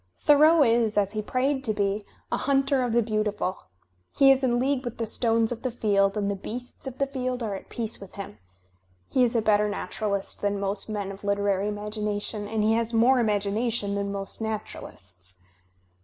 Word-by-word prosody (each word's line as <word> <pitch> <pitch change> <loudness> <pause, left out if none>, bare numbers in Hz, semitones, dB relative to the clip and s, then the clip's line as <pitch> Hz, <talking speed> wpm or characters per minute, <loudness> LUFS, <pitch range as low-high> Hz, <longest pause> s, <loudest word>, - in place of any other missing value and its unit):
Thoreau 305 +2 +6
is, 230 -3 +2
as 200 -1 +2
he 215 0 -2
prayed 265 +5 0
to 220 -5 +2
be, 200 +1 0 0.3
a - - +1
"hunter 275 0 +2
of 245 -2 0
the 235 +1 +3
beautiful." 210 -3 -2 0.5
He 275 -1 +7
is 270 0 +3
in 240 -2 +2
league 265 +1 0
with 240 -2 -5
the 230 - -1
stones 225 0 +1
of 235 -1 -4
the 255 - -1
field, 200 -4 +1
and 205 -1 0
the - - -2
beasts 245 +7 -7
of 260 -1 -6
the 275 - +1
field 255 -2 -3
are 210 -3 -2
at 195 - -8
peace 225 -3 -3
with 195 - -11
him. 195 - -8 0.7
He 255 - +4
is 240 -1 +1
a 225 - +2
better 210 -1 +3
naturalist 200 -1 -3
than 205 0 0
most 200 +1 -1
men 205 -2 -3
of 195 +1 -11
literary 200 -1 +1
imagination, 210 0 -2
and 220 0 -1
he 220 +1 +3
has 230 0 0
more 250 +3 +5
imagination 210 0 0
than 200 0 -2
most 195 +2 -5
naturalists. 95 - -6
215 Hz, 195 wpm, -26 LUFS, 200-245 Hz, 0.7 s, He